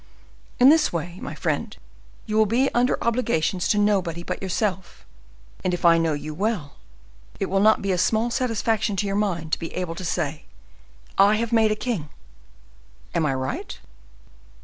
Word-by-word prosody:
In 255 Hz, +2 st, +8 dB
this 310 Hz, 0 st, +4 dB
way, 170 Hz, +2 st, -4 dB
my 145 Hz, -, -6 dB
friend, 155 Hz, -3 st, -2 dB, 0.5 s
you 215 Hz, -, -3 dB
will 220 Hz, 0 st, +4 dB
be 250 Hz, +6 st, +1 dB
under 245 Hz, +1 st, +2 dB
obligations 220 Hz, -7 st, 0 dB
to 210 Hz, -, +2 dB
nobody 190 Hz, -5 st, +1 dB
but -, -, -5 dB
yourself; 190 Hz, 0 st, -3 dB, 0.6 s
and, 180 Hz, -1 st, +1 dB
if 175 Hz, -, -5 dB
I 165 Hz, -1 st, +6 dB
know 165 Hz, -1 st, +1 dB
you 150 Hz, +1 st, -5 dB
well, 185 Hz, -5 st, -2 dB, 0.6 s
it 195 Hz, -, -2 dB
will 195 Hz, -, +2 dB
not 215 Hz, +1 st, +4 dB
be 200 Hz, -, 0 dB
a 180 Hz, -, 0 dB
small 225 Hz, +5 st, +1 dB
satisfaction 225 Hz, -3 st, 0 dB
to 195 Hz, -, -1 dB
your 195 Hz, 0 st, -1 dB
mind 175 Hz, -6 st, -1 dB
to -, -, +1 dB
be 165 Hz, -, -6 dB
able 180 Hz, -2 st, -3 dB
to 175 Hz, -, -8 dB
say, 160 Hz, -4 st, -2 dB, 0.7 s
'I 200 Hz, +2 st, +6 dB
have 230 Hz, +1 st, -2 dB
made 220 Hz, -1 st, +4 dB
a -, -, +1 dB
king!' 210 Hz, -10 st, -3 dB, 1.0 s
Am 165 Hz, -3 st, +1 dB
I 135 Hz, -, 0 dB
right?" 130 Hz, 0 st, -4 dB
195 Hz, 175 wpm, -24 LUFS, 165-220 Hz, 1.0 s, In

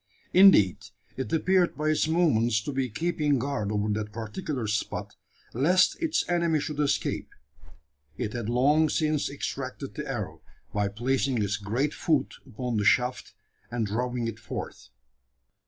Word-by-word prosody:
Indeed, 170 Hz, -, +7 dB, 0.4 s
it 130 Hz, -, -4 dB
appeared 180 Hz, +2 st, +2 dB
by 155 Hz, +1 st, 0 dB
its 155 Hz, 0 st, +2 dB
movements 120 Hz, -10 st, +2 dB
to 145 Hz, -, -4 dB
be 135 Hz, -2 st, -1 dB
keeping 150 Hz, +2 st, 0 dB
guard 120 Hz, -5 st, -2 dB
over 105 Hz, 0 st, 0 dB
that 105 Hz, 0 st, -2 dB
particular 115 Hz, -, -4 dB
spot, 105 Hz, -1 st, -3 dB, 0.4 s
lest 175 Hz, +9 st, +3 dB
its 330 Hz, -2 st, 0 dB
enemy 170 Hz, -3 st, +2 dB
should 150 Hz, 0 st, -4 dB
escape. 145 Hz, -2 st, 0 dB, 0.9 s
It 105 Hz, -, -3 dB
had 120 Hz, -2 st, -3 dB
long 145 Hz, +6 st, +3 dB
since 155 Hz, -1 st, 0 dB
extracted -, -, -5 dB
the -, -, -5 dB
arrow, -, -, -4 dB, 0.3 s
by 105 Hz, -1 st, +1 dB
placing 125 Hz, +3 st, 0 dB
its 100 Hz, +1 st, -1 dB
great 120 Hz, +8 st, -1 dB
foot 150 Hz, -5 st, 0 dB
upon 120 Hz, +1 st, -3 dB
the 105 Hz, -, +1 dB
shaft, 125 Hz, +4 st, +1 dB, 0.3 s
and 120 Hz, -1 st, -1 dB
drawing 120 Hz, +3 st, -2 dB
it 115 Hz, 0 st, -5 dB
forth. 110 Hz, -, -7 dB
130 Hz, 145 wpm, -27 LUFS, 110-155 Hz, 0.9 s, Indeed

